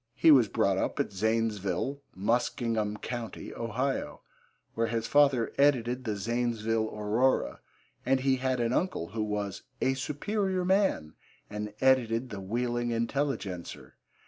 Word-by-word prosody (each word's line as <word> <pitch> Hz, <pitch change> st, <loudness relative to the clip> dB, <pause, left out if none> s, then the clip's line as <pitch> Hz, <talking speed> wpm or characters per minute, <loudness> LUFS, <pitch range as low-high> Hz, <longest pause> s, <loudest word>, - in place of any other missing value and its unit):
He 165 Hz, -, +6 dB
was 130 Hz, -6 st, +7 dB
brought 100 Hz, -1 st, +1 dB
up -, -, -2 dB
at -, -, -1 dB
Zanesville, 110 Hz, +4 st, -1 dB
Muskingum 110 Hz, 0 st, 0 dB
Co., 120 Hz, -3 st, -3 dB, 0.3 s
Ohio, 125 Hz, +4 st, -2 dB, 0.5 s
where 115 Hz, 0 st, 0 dB
his 115 Hz, 0 st, -2 dB
father 140 Hz, -5 st, +3 dB
edited 125 Hz, -3 st, +2 dB
the 110 Hz, -2 st, -1 dB
Zanesville 115 Hz, 0 st, -1 dB
Aurora, 105 Hz, -, +1 dB, 0.4 s
and 130 Hz, 0 st, +2 dB
he 135 Hz, 0 st, +2 dB
had 130 Hz, 0 st, 0 dB
an 120 Hz, 0 st, +1 dB
uncle 165 Hz, -, -1 dB
who 110 Hz, +3 st, -3 dB
was 105 Hz, -2 st, -3 dB, 0.2 s
'a 130 Hz, -, +2 dB
superior 185 Hz, +7 st, -1 dB
man' 190 Hz, -, +1 dB, 0.4 s
and 105 Hz, 0 st, -5 dB
edited 125 Hz, -2 st, +3 dB
the 100 Hz, -2 st, -5 dB
Wheeling 120 Hz, +4 st, -1 dB
Intelligencer. 115 Hz, -6 st, -3 dB
115 Hz, 130 wpm, -29 LUFS, 105-130 Hz, 0.5 s, was